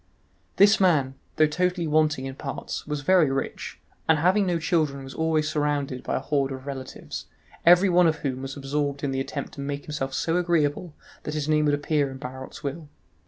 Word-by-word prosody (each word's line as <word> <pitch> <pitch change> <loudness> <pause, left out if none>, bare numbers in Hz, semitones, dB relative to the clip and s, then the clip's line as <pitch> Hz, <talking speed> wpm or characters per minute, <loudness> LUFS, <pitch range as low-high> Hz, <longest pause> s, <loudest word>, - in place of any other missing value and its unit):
This 205 +2 +6
man, 155 -9 +3 0.2
though 155 - +5
totally 180 +3 0
wanting 155 -3 +2
in 135 - -5
parts, 135 0 -6
was 150 -1 -3
very 170 -1 +4
rich, 135 0 -4 0.3
and 160 - +6
having 185 +5 +3
no 175 -1 +1
children 155 -4 0
was 135 - -9
always 160 -1 +1
surrounded 145 -4 -1
by - - -2
a - - +1
horde 140 0 0
of 130 0 -7
relatives, 135 -2 -7 0.4
every 180 +3 +7
one 180 -1 +5
of 160 - +2
whom 130 -1 -2
was 135 +1 -6
absorbed 140 +1 -2
in 140 - 0
the 135 - -1
attempt 140 +1 -5
to 140 - -7
make 140 0 -4
himself 135 -3 -3
so 165 +1 0
agreeable 170 -2 0 0.3
that 150 - -5
his 150 -1 -2
name 150 0 +3
would 145 -1 +3
appear 145 -1 0
in 130 - -8
Barot's 130 +2 -8
will. 145 +2 -5
150 Hz, 200 wpm, -25 LUFS, 135-160 Hz, 0.4 s, every